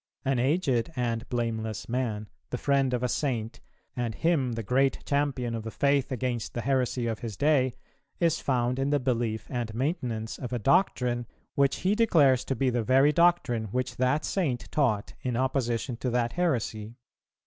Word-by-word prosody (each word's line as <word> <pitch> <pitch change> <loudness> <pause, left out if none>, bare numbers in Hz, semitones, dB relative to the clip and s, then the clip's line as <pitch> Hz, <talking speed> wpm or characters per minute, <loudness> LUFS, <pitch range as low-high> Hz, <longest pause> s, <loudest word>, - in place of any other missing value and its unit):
An 135 -2 +1
aged 130 -2 +1
and 120 -2 -2
blameless 110 -3 -2
man, 115 -4 -2 0.2
the 125 - -2
friend 135 0 +2
of 125 0 -1
a - - +2
Saint, 120 -4 -2 0.4
and 120 -3 -2
him 145 -8 +1
the 115 0 -4
great 135 +5 +1
champion 140 -4 0
of 115 - -3
the 110 - -6
faith 140 +2 +1
against 125 -2 -2
the 120 - -1
heresy 125 -1 0
of 115 -2 -2
his 110 -5 -6
day, 140 -4 +2 0.4
is 170 -2 +2
found 125 -1 0
in 135 +1 +1
the 145 0 +2
belief 115 -4 -1
and 120 -4 -3
maintenance 125 -5 -2
of 125 - -5
a 125 - 0
doctrine, 125 - +2 0.3
which 140 -1 +1
he 190 +2 +2
declares 155 - +4
to 135 - -1
be 130 +2 +1
the 120 -1 0
very 135 +5 +4
doctrine 150 -9 +2
which 125 +5 -3
that 130 +4 +1
Saint 140 -11 -1
taught 115 -9 +1
in 125 -2 -2
opposition 125 -2 0
to 125 - -2
that 120 -1 0
heresy. 115 -10 -1
125 Hz, 175 wpm, -28 LUFS, 115-140 Hz, 0.4 s, declares